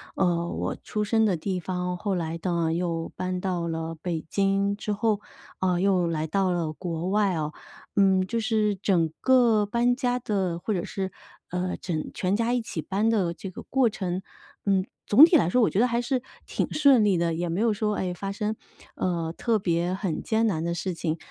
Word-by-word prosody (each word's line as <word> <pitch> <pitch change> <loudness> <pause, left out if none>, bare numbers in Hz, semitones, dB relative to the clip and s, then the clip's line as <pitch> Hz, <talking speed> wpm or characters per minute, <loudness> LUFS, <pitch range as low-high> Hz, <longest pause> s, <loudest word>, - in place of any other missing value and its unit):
呃， 170 -2 +1
我 - - -3
出 210 - -2
生 220 +1 +2
的 200 -4 +2
地 185 +3 -2
方， 180 0 -3
后 195 +1 -1
来 165 -1 -3
呢 170 -3 0
又 165 -1 -2
搬 185 0 -2
到 180 -3 -1
了 165 0 -3
北 170 -3 -2
京 200 0 +1
之 210 0 -2
后， 210 0 +1 0.4
呃， 180 -1 +1
又 185 -3 +3
来 160 -1 -1
到 190 +3 +1
了 170 -3 -1
国 170 +1 -4
外 200 -1 +2
啊， 155 -2 -2 0.5
嗯， 190 -1 +4
就 230 +5 -2
是 215 -2 +1
整 180 -4 +2
个 240 -5 +4
搬 240 +3 +2
家 250 -2 0
的， 190 -7 -1
或 215 - -2
者 180 -2 -2
是， 190 -1 -4 0.4
呃， 180 +1 -2
整 160 -4 -3
全 190 +2 0
家 230 +1 +1
一 250 - +1
起 175 -7 -5
搬 200 +7 0
的 190 -7 +1
这 190 +4 -7
个 185 - -9
过 260 -3 +2
程， 185 -3 -3 0.4
嗯， 195 -2 +2 0.2
总 270 +9 +9
体 345 - +3
来 225 - +4
说 250 +7 +3
我 225 - +4
觉 - - -3
得 240 +4 +5
还 235 -1 0
是 255 +1 -1 0.2
挺 - - -2
顺 280 -6 +5
利 200 -3 +3
的， 170 -1 +1
也 170 +1 -2
没 170 +3 -1
有 225 0 +3
说， 210 0 -1
诶， 180 -1 -2
发 195 +2 -4
生， 210 +2 -2 0.4
呃， 170 -3 -1
特 230 -3 +1
别 175 -1 0
很 190 -4 -2
艰 225 0 +2
难 160 -6 -1
的 170 0 -1
事 175 +2 -3
情。 165 -1 -2
190 Hz, 220 characters per minute, -26 LUFS, 170-215 Hz, 0.5 s, 总